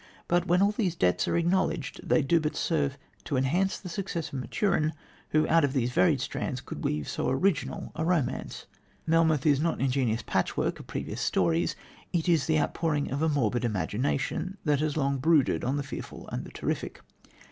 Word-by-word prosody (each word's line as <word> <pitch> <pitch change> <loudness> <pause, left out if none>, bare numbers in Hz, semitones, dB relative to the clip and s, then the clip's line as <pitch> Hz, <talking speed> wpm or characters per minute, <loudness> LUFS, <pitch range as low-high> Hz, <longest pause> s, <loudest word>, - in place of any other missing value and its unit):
But, 175 0 +2
when 180 +3 +4
all 200 - +4
these 200 -5 -1
debts 90 - +2
are - - +1
acknowledged 170 -3 0
they 160 - +3
do 165 +5 +3
but 155 -1 -2
serve 145 -4 0 0.3
to 140 - -1
enhance 170 +9 +1
the 190 - -9
success 170 -3 -3
of 135 - -2
Maturin, 155 - 0 0.4
who 155 0 +2
out 165 -1 +4
of 140 -2 +1
these 125 -3 0
varied 95 -6 +3
strands - - -3
could - - -8
weave 75 -1 -1
so - - -1
original 135 -1 0
a 160 - -3
romance. 165 -7 -1 0.4
Melmoth 160 -3 +3
is 145 -3 +4
not 165 +2 +1
an - - -7
ingenious 125 -4 +1
patchwork - - -1
of - - -11
previous - - -4
stories. 85 -2 +1 0.4
It 170 0 0
is 165 -6 +3
the 155 -1 +3
outpouring 150 -2 0
of 140 +2 -2
a 160 - +3
morbid 125 -4 +1
imagination 130 - -1
that 145 -2 +3
has 155 0 -1
long 140 -2 +1
brooded 155 0 +3
on 135 +3 0
the 145 - -1
fearful 140 - -8
and - - -4
the - - -11
terrific. - - -3
150 Hz, 190 wpm, -28 LUFS, 130-165 Hz, 0.4 s, when